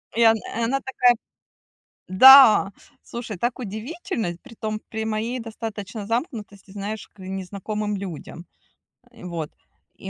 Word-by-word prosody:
Я, 225 -1 +6
и 225 +1 -6
она 265 +4 0
такая: 250 -2 +2 0.9
"Да, 220 0 +8 0.3
слушай, 235 -4 -7
так 240 +6 -1
удивительно". 220 - -4
Притом 220 -4 -6
при 220 0 -4
моей 220 +3 -2
достаточно 220 -2 -7
замкнутости, 215 - -4
знаешь, 205 +2 -6
к - - -28
незнакомым 200 +3 -4
людям. 175 -3 -8 0.7
Э, 235 - -16
вот. 165 -4 -5 0.4
И. - - -9
215 Hz, 120 wpm, -23 LUFS, 200-235 Hz, 0.9 s, Да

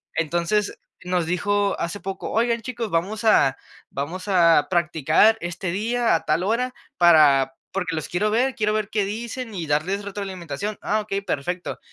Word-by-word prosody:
Entonces, 170 +6 0 0.3
nos 180 -2 0
dijo 200 +3 0
hace 170 +4 -4
poco: 195 0 -5
"Oigan, 235 +1 +1
chicos, 235 -2 -4
vamos 195 +7 -1
a 140 -11 +4 0.3
vamos 165 +8 -5
a 170 -6 +4
practicar 170 +5 +3
este 175 +1 -4
día 230 +5 +1
a - - 0
tal 175 - +1
hora 250 +5 0 0.2
para 145 -6 +5 0.2
porque 180 -3 -2
los 155 -2 -4
quiero 210 +4 0
ver, 255 +4 +2
quiero 210 -2 0
ver 215 -1 -1
qué 210 -3 0
dicen 230 +2 -5
y 170 - -3
darles 160 +7 -1
retroalimentación". 195 -2 -5
Ah 215 +1 0
okey, 200 -1 -3
perfecto. 175 -1 -3
195 Hz, 160 wpm, -23 LUFS, 170-215 Hz, 0.3 s, para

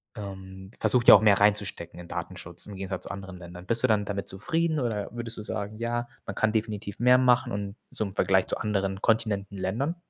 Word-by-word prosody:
ähm, 95 -2 -9
versucht 125 -1 +4
ja - - +12
auch - - +5
mehr 105 -2 +5
reinzustecken 100 -4 +1
in 85 - -10
Datenschutz 85 +3 -6
im 100 - -8
Gegensatz 95 -1 -5
zu - - -6
anderen 95 -2 -8
Ländern. 90 0 -11
Bist 115 +4 +2
du - - +5
dann 105 -2 +2
damit 100 -1 -4
zufrieden 160 - -1
oder 110 -5 -2
würdest 120 -1 -3
du - - -5
sagen: 105 0 -3
„Ja, 120 +1 -2 0.2
man - - -5
kann 110 - +2
definitiv 105 -2 -3
mehr 125 +1 +6
machen 125 -2 +3
und 100 0 -4 0.2
zum 100 -3 -2
Vergleich 95 0 +2
zu - - -1
anderen 100 -2 -2
Kontinenten, 105 -3 0
Ländern?“ 120 - -2
105 Hz, 210 wpm, -27 LUFS, 95-115 Hz, 0.2 s, ja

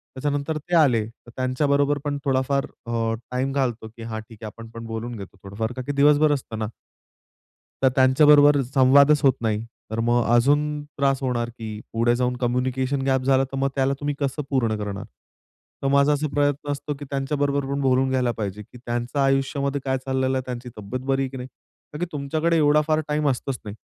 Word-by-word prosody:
त्याच्यानंतर 145 +3 -2
ते 165 +4 -2
आले, 125 -9 +4
तर 120 +1 -17
त्यांच्याबरोबर 140 +3 +1
पण 145 -1 -2
थोडाफार 135 +1 +1 0.2
अ, 115 -1 -1 0.2
टाईम 130 +2 -1
घालतो, 120 -5 -1
की 115 - -8
हा 110 -1 -5
ठीक 110 0 -13
आहे, 110 - -5
आपण 115 +1 -10
पण 115 0 -8
बोलून 115 +2 -5
घेतो 100 -2 -10
थोडंफार 110 +4 -4
का 130 - -2
की - - 0
दिवसभर 145 +2 +4
असतं 120 -5 -4
ना 110 - -1 1.1
तर 130 - +5
त्यांच्याबरोबर 145 +2 +6
संवादच 140 +2 +6
होत 135 - +6
नाही. 110 -1 -1 0.3
तर 110 - -2
मग 120 +1 +2
अजून 145 +4 +2
त्रास 140 -2 0
होणार, 120 -2 -1
की 110 -3 -7
पुढे 115 +1 +2
जाऊन 125 0 0
कम्युनिकेशन 130 +2 0
गॅप 130 -1 +2
झाला, 135 0 +3
तर 135 0 -6
मग 135 0 +1
त्याला 135 0 +2
तुम्ही 145 0 -2
कसं 140 +1 -1
पूर्ण 120 -5 +1
करणार. 105 -1 -4 0.8
तर 135 - +1
माझा 140 +1 +4
असा 150 +1 -1
प्रयत्न 145 0 0
असतो, 145 +1 -3
की 145 - -7
त्यांच्याबरोबर 140 0 -1
पण 140 0 -1
बोलून 130 0 +2
घ्यायला 125 -2 +1
पाहिजे, 105 -1 -4
की 115 - -14
त्यांचं 120 +3 -2
आयुष्यामध्ये 135 +1 +1
काय 130 0 +1
चाललेलं 130 0 0
आहे, 130 - -3
त्यांची 125 0 -6
तब्येत 125 +6 -6
बरी 135 0 +1
आहे 130 - -3
की 130 - -8
नाही? 125 - -6 0.5
का - - -5
की 175 - 0
तुमच्याकडे 155 +3 0
एवढा 150 0 +4
फार 155 0 +2
टाईम 150 -1 +1
असतंच 130 0 -2
नाही. 105 0 -6
130 Hz, 195 wpm, -23 LUFS, 120-145 Hz, 1.1 s, त्यांच्याबरोबर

